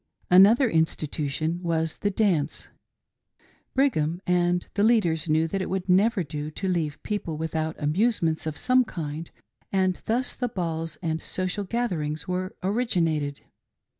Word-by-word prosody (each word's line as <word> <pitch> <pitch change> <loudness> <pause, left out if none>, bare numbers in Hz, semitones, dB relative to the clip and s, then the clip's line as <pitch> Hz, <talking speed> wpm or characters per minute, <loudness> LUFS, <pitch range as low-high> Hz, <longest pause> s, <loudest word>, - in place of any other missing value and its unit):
Another 210 +8 +7
institution 160 -1 -1
was 165 -2 -1
the 205 - +1
dance 185 -8 0 1.1
Brigham 175 - +2
and 175 0 +1
the 200 - 0
lead 220 -1 +4
ers 160 -1 -1
knew 160 +1 +3
that 195 +4 -2
it - - -3
would 190 -1 -2
never 195 +2 +3
do 150 0 -5
to 190 +5 -4
leave 165 -5 0
the - - -25
people 185 -7 -3
without 160 0 -2
amusements 160 0 +1
of 155 - -3
some 255 0 +3
kind, 160 -6 -6 0.4
and 185 -2 +1
thus 245 +3 +1
the 245 -1 -2
balls 165 -6 -3
and 160 -1 -1
social 185 +2 -2
gath 235 +3 -1
erings 150 -2 -3
were 185 +1 -3
originated. 170 - 0
175 Hz, 150 wpm, -26 LUFS, 160-200 Hz, 1.1 s, Another